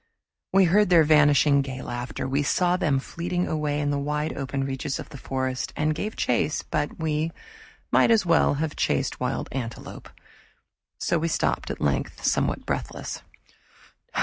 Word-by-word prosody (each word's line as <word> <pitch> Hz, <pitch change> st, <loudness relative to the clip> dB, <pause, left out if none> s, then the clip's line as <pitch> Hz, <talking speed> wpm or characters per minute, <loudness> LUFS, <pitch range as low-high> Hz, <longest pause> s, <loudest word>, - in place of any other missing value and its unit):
We 195 Hz, +1 st, +5 dB
heard 200 Hz, +3 st, +4 dB
their 170 Hz, -3 st, +7 dB
vanishing 145 Hz, -2 st, +5 dB
gay 135 Hz, -1 st, -6 dB
laughter, 120 Hz, +1 st, -4 dB
we 135 Hz, +2 st, +1 dB
saw 175 Hz, +5 st, +2 dB
them 155 Hz, -7 st, +1 dB
fleeting 175 Hz, +6 st, -2 dB
away 150 Hz, -2 st, -1 dB
in 145 Hz, -1 st, 0 dB
the 145 Hz, -, 0 dB
wide 150 Hz, +2 st, -2 dB
open 135 Hz, 0 st, -3 dB
reaches 135 Hz, 0 st, -3 dB
of -, -, -8 dB
the 140 Hz, -, -9 dB
forest, 130 Hz, -1 st, -3 dB
and 155 Hz, +1 st, +1 dB
gave 210 Hz, +8 st, -4 dB
chase, 125 Hz, +5 st, 0 dB
but 150 Hz, -1 st, -2 dB
we 160 Hz, 0 st, -1 dB, 0.6 s
might -, -, +5 dB
as 225 Hz, -4 st, +4 dB
well 165 Hz, -3 st, +3 dB
have 155 Hz, +1 st, -2 dB
chased -, -, 0 dB
wild -, -, -2 dB
antelopes; 120 Hz, -3 st, -6 dB, 0.9 s
so 170 Hz, -, 0 dB
we 165 Hz, -, 0 dB
stopped 165 Hz, -, 0 dB
at -, -, -4 dB
length 70 Hz, -2 st, -1 dB
somewhat -, -, +1 dB
breathless. -, -, -4 dB
150 Hz, 160 wpm, -25 LUFS, 135-165 Hz, 0.9 s, their